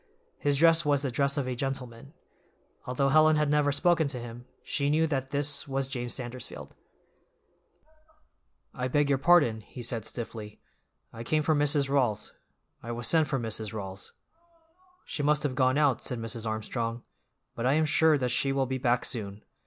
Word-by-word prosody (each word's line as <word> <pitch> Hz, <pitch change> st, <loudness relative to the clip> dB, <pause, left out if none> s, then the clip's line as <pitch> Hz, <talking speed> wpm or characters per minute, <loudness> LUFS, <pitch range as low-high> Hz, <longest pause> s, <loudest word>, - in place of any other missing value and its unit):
His 145 Hz, -1 st, +1 dB
dress 165 Hz, +2 st, +5 dB
was 145 Hz, -2 st, +1 dB
the 135 Hz, -, -1 dB
dress 140 Hz, +3 st, +1 dB
of 135 Hz, -3 st, -1 dB
a 130 Hz, -, -2 dB
gentleman. 135 Hz, +1 st, -5 dB, 0.7 s
Although 135 Hz, +2 st, +1 dB
Helen 155 Hz, +2 st, +5 dB
had 150 Hz, -1 st, +1 dB
never 150 Hz, -1 st, +3 dB
spoken 160 Hz, +2 st, +2 dB
to 135 Hz, -3 st, -5 dB
him, 120 Hz, +1 st, -9 dB, 0.2 s
she 140 Hz, 0 st, -1 dB
knew 155 Hz, +2 st, +3 dB
that 135 Hz, -4 st, -2 dB
this 145 Hz, +1 st, 0 dB
was 135 Hz, -1 st, -1 dB
James 120 Hz, -3 st, -4 dB
Sandersfield. 125 Hz, -1 st, -7 dB, 2.0 s
"I 125 Hz, 0 st, -3 dB
beg 145 Hz, +2 st, +1 dB
your 135 Hz, -2 st, +2 dB
pardon," 140 Hz, -9 st, +4 dB
he 120 Hz, +3 st, -10 dB
said 115 Hz, -2 st, -2 dB
stiffly, 110 Hz, -3 st, -7 dB, 0.5 s
"I 115 Hz, -, -8 dB
came 155 Hz, +5 st, 0 dB
for 155 Hz, -, +2 dB
Mrs. 145 Hz, -1 st, +2 dB
Rawls. 125 Hz, -7 st, 0 dB, 0.5 s
I 115 Hz, -, -6 dB
was 120 Hz, 0 st, -3 dB
sent 160 Hz, -2 st, +4 dB
for 135 Hz, -, -1 dB
Mrs. 110 Hz, -3 st, -3 dB
Rawls." 95 Hz, -3 st, -7 dB, 0.9 s
"She -, -, -4 dB
must 150 Hz, +1 st, +2 dB
have 145 Hz, -3 st, -1 dB
gone 130 Hz, +1 st, +2 dB
out," 145 Hz, -5 st, +2 dB
said 125 Hz, -, -3 dB
Mrs. 115 Hz, 0 st, -5 dB
Armstrong, 115 Hz, +2 st, -3 dB, 0.5 s
"but 120 Hz, +1 st, -2 dB
I 135 Hz, -, +3 dB
am 155 Hz, +1 st, +3 dB
sure 155 Hz, 0 st, +4 dB
that 125 Hz, -2 st, -1 dB
she 135 Hz, +3 st, +1 dB
will 135 Hz, -1 st, +1 dB
be 130 Hz, 0 st, -3 dB
back 125 Hz, -1 st, +1 dB
soon. 105 Hz, -3 st, -6 dB
135 Hz, 175 wpm, -28 LUFS, 120-145 Hz, 2.0 s, dress